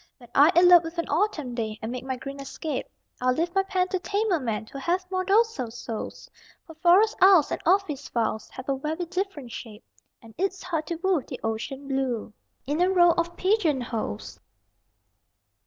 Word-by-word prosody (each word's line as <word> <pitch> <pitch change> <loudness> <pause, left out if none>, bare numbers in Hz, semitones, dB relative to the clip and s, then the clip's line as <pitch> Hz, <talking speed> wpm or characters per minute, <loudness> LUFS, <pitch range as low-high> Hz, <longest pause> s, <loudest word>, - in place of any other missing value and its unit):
When 240 -3 -17
I 290 +4 +6
elope 350 0 +8
with 330 +1 -7
an 335 - -1
autumn 305 -6 0
day 220 -2 -3
And 220 - -5
make 250 0 -5
my 260 0 -3
green 275 +2 -8
escape, 275 +1 -4 0.3
I'll 255 0 +2
leave 340 +3 -1
my 390 - +3
pen 375 -1 0
to 370 - -1
tamer 405 -1 0
men 225 -4 -3
Who 275 - -9
have 355 +6 0
more 370 0 0
docile 395 - +2
souls; 225 -1 -7 0.4
For 325 - -12
forest 360 +7 +4
aisles 370 -5 +6
and - - -2
office 340 -7 +1
files 225 -2 -2
Have 260 - -10
a 275 -1 0
very 315 +5 -3
different 360 -8 -4
shape, 220 -1 -9 0.4
And 225 -1 -15
it's 380 0 -1
hard 330 -4 -3
to 340 - -2
woo 375 -5 +2
the - - -8
ocean 250 +5 -4
blue 260 -5 -2 0.3
In 295 +5 -1
a 360 - +4
row 350 -2 +5
of 340 +1 -2
pigeon 370 -8 +2
holes! 215 - -5
315 Hz, 190 wpm, -26 LUFS, 255-365 Hz, 0.4 s, elope